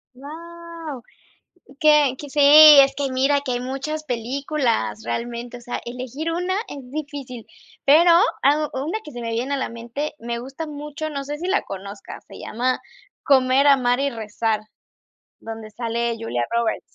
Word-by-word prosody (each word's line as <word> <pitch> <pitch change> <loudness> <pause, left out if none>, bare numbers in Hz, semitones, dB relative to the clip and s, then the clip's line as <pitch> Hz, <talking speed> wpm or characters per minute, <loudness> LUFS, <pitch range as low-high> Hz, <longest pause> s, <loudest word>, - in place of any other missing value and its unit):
Wau. 330 0 -9 0.8
Que 300 -3 +5
que 290 - -8
sí, 290 +2 -1 0.4
es 275 0 +6
que 280 -2 -2
mira 270 +2 +2
que 275 -3 -3
hay 245 - -2
muchas 275 +5 -4
películas 255 -1 -1
realmente, 235 +1 -5
o - - -11
sea, 245 +1 -5
elegir 255 +6 -5
una 360 +3 -1
es 265 -3 -9
difícil. 280 -5 -7 0.4
Pero, 320 +5 +6 0.3
ah, 300 +2 +3
una 300 +11 -2
que 300 - -11
se 240 -1 -7
me 230 - -3
viene 245 +5 -2
a - - 0
la 265 - -3
mente, 235 +6 -5
me 235 -1 -4
gusta 270 +6 -7
mucho, 300 +1 -6
no 280 -2 -5
sé 295 +2 -5
si 355 +3 -4
la 395 - +2
conozcas, 200 +1 -9
se - - -11
llama 250 +3 -2 0.4
Comer, 265 0 +4
Amar 250 -3 +4
y 280 0 +1
Rezar, 220 -1 -2 0.8
donde 225 -1 -8
sale 235 +1 -2
Julia 120 - -2
Roberts. 235 -1 0
270 Hz, 165 wpm, -22 LUFS, 235-295 Hz, 0.8 s, es